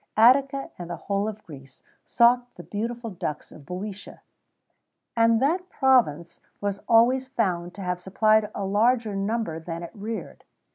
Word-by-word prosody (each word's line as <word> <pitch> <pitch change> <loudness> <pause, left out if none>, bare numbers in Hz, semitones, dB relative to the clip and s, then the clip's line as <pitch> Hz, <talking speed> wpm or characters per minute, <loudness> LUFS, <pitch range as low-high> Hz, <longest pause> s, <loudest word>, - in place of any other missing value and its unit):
Attica 270 +4 +4
and 175 -1 -7
the 175 - -3
whole 200 +5 -2
of 215 0 -6
Greece 135 -4 -14 0.2
sought 245 +1 +3
the - - -10
beautiful 230 +2 -4
ducks 155 -5 -5
of - - -13
Bœotia,[XVII 195 +3 -5 0.2
38] - - -26 1.0
and 230 -1 +4
that 350 +8 0
province 225 - +2 0.2
was 200 -1 -3
always 250 +3 +4
found 180 -9 -2
to 200 - -7
have 180 0 -2
supplied 215 +3 +2
a 200 - -3
larger 220 +2 +2
number 200 -4 -2
than 165 +1 -6
it 170 - -8
reared. 220 +2 -7
215 Hz, 155 wpm, -25 LUFS, 180-240 Hz, 1.0 s, Attica